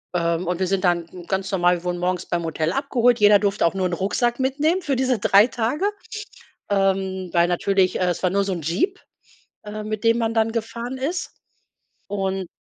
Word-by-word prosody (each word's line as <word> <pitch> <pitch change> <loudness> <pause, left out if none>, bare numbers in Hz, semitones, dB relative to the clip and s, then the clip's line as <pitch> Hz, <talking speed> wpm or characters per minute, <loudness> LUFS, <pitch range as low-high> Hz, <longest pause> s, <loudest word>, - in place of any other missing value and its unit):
Ähm, 170 0 0
und 180 0 -1
wir 185 - 0
sind 195 0 0
dann 175 0 -1
ganz 190 0 -2
normal 180 -2 +3
wir - - -19
wurden 175 0 -1
morgens 180 0 -1
beim 170 -1 -1
Hotel 160 0 -1
abgeholt, 245 -3 +2
jeder 205 -1 +7
durfte 200 0 0
auch 170 - +1
nur 190 -1 0
’n 175 - -4
Rucksack 235 +7 0
mitnehmen 295 +7 +1
für 285 -4 -1
diese 255 -2 +1
3 200 +1 +6
Tage, 250 - -1 0.9
ähm, 190 -2 0
weil 170 0 +3
natürlich 185 +1 +1
es 180 -1 0
war 185 - +2
nur 200 +1 +1
so 195 - -2
’n 170 -3 -4
Jeep, 195 - -1 0.7
ähm, 215 0 -6
mit 215 +1 -4
dem 230 0 +4
man 225 -1 0
dann 225 0 +2
gefahren 235 +2 -4
ist. 325 +8 -3 0.7
Und 195 -2 -2
195 Hz, 195 wpm, -22 LUFS, 180-235 Hz, 0.9 s, jeder